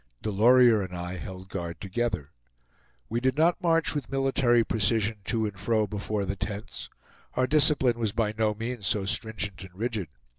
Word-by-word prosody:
Delorier 115 +2 +5
and 90 -2 -5
I 90 +1 -5
held 95 +3 -8
guard 85 -4 -5
together. 100 - -2 0.8
We 115 - -1
did 130 +2 0
not 170 +4 +3
march 165 -2 +2
with 145 -2 -4
military 135 -3 +2
precision 110 0 +1
to 115 -2 0
and 100 -3 -5
fro 110 +2 +1
before 105 0 -3
the 95 +1 -2
tents; 100 +3 -5 0.5
our 130 - +2
discipline 140 -4 +4
was 110 -3 0
by 110 -1 0
no 110 -1 +1
means 115 -2 -4
so 100 0 +1
stringent 100 -2 -2
and 95 -1 -13
rigid. 110 -3 -2
110 Hz, 170 wpm, -27 LUFS, 100-120 Hz, 0.8 s, Delorier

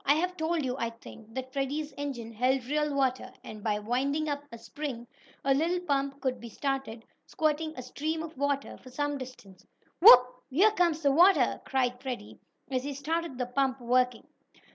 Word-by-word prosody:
I 285 - +4
have 360 +3 -1
told 320 -2 -1
you, 250 -1 -1
I 230 - 0
think, 225 -1 -14
that 260 0 -5
Freddie's 285 +2 -2
engine 250 -6 -5
held 255 +3 +1
real 300 +2 0
water, 260 -2 0
and, 215 -1 -9
by 210 -2 +1
winding 270 +8 -1
up 285 0 -2
a 235 - -8
spring 245 0 -6 0.4
a 275 - +4
little 335 +6 +1
pump 280 -5 -1
could 255 -2 -1
be 235 0 -9
started, 270 -2 -3 0.2
squirting 310 0 -1
a 255 - -5
stream 310 +5 -3
of 325 0 -8
water 280 0 -1
for 255 - -14
some 290 +2 -2
distance. 245 -8 -11 0.4
"Whoop! 250 - +10 0.2
Here 370 +11 +4
comes 340 -6 +1
the 280 - +4
water!" 330 -3 +4
cried 250 -2 0
Freddie, 175 - -6 0.3
as 255 -1 0
he 285 0 -4
started 320 0 -2
the 250 - -1
pump 265 +1 0
working. 250 0 +1
270 Hz, 185 wpm, -29 LUFS, 250-300 Hz, 0.4 s, Whoop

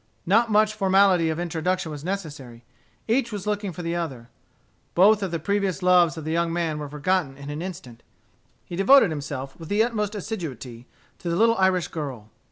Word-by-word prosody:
Not 225 +6 +3
much 215 0 +3
formality 190 -4 +3
of 160 +1 -2
introduction 175 +1 -2
was 145 -1 -7
necessary: 145 -11 -6 0.4
each 235 +1 +1
was 205 -2 -5
looking 205 -2 -2
for 175 +1 -8
the 170 +1 -2
other. 130 -9 -5 0.6
Both 205 +4 +5
of 195 - -2
the 170 - -2
previous 195 +2 -1
loves 175 -2 +4
of 160 - -7
the 155 - -2
young 170 0 0
man 165 -3 -1
were 145 -1 -6
forgotten 150 -1 -1
in 140 +1 -7
an 150 +2 -5
instant. 155 -11 -8 0.6
He 175 - -7
devoted 210 +1 +6
himself 140 -3 -5
with 165 - -9
the 210 +2 +3
utmost 215 -3 -2
assiduity, 135 - -6 0.3
to 175 - -4
the 170 - 0
little 230 +4 +4
Irish 190 -2 +2
girl. 130 -9 -6
175 Hz, 185 wpm, -24 LUFS, 150-200 Hz, 0.6 s, devoted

